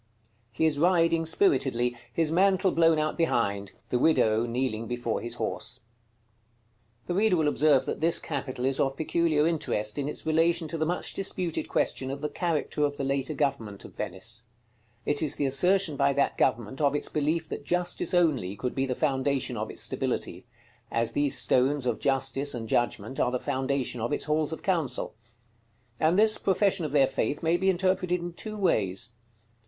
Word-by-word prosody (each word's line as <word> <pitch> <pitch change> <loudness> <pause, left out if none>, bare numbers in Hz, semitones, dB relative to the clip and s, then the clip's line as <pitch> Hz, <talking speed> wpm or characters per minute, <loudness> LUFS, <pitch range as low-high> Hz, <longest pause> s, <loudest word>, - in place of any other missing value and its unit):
He 125 +8 0
is 150 -2 +1
riding 165 -1 +3
spiritedly, 130 - +2 0.2
his 160 -2 +1
mantle 190 +1 +3
blown 165 -1 +4
out 155 +2 -1
behind: 100 -11 0 0.2
the 125 - +2
widow 115 -7 +3
kneeling 115 -2 -2
before 120 -1 -2
his 120 0 -3
horse. - - -3
§ - - -14
CXXVIII. 115 0 -33
The - - -1
reader 200 +1 +3
will 155 -2 +2
observe 145 -2 +3
that - - -4
this 170 +1 +2
capital 130 -4 -4
is 135 0 0
of 135 0 0
peculiar 160 -1 +1
interest 110 -9 -1
in 145 0 -2
its - - -4
relation 165 +1 +2
to 165 - -3
the 155 - +1
much 175 +1 -2
disputed 175 -4 -2
question 130 - 0
of 140 +1 -5
the 150 - -2
character 150 -1 -1
of 145 -1 0
the - - -3
later 135 +2 -1
government 115 -8 -2
of - - -13
Venice. 110 +5 -5 0.6
It 145 0 +1
is 150 -2 0
the 145 - -1
assertion 165 +4 +2
by 140 0 +3
that 140 +1 +1
government 125 +1 0
of 145 0 +2
its 145 - -1
belief 155 +2 -1
that - - -5
Justice 180 +3 -1
only 140 - +2
could 125 +3 -3
be 135 0 -1
the 125 - -2
foundation 135 -3 0
of 110 0 -3
its - - -3
stability; - - -3 0.4
as 115 0 0
these 145 -1 +1
stones 130 +2 +2
of 120 -3 -1
Justice 135 0 0
and 115 -2 -5
Judgment 120 +3 -1
are - - +2
the 125 0 -2
foundation 130 -2 -2
of 120 - -2
its - - 0
halls 150 +1 0
of 160 - -6
council. 165 -9 -1 0.9
And 160 +3 +3
this 215 +1 +4
profession 190 -2 +1
of 150 - -4
their 140 -2 +5
faith 140 +3 -2
may 165 +1 +3
be 190 +2 +1
interpreted 185 -1 +1
in 175 0 -6
two 215 +4 -6
ways. 100 - 0
145 Hz, 185 wpm, -27 LUFS, 120-165 Hz, 0.9 s, their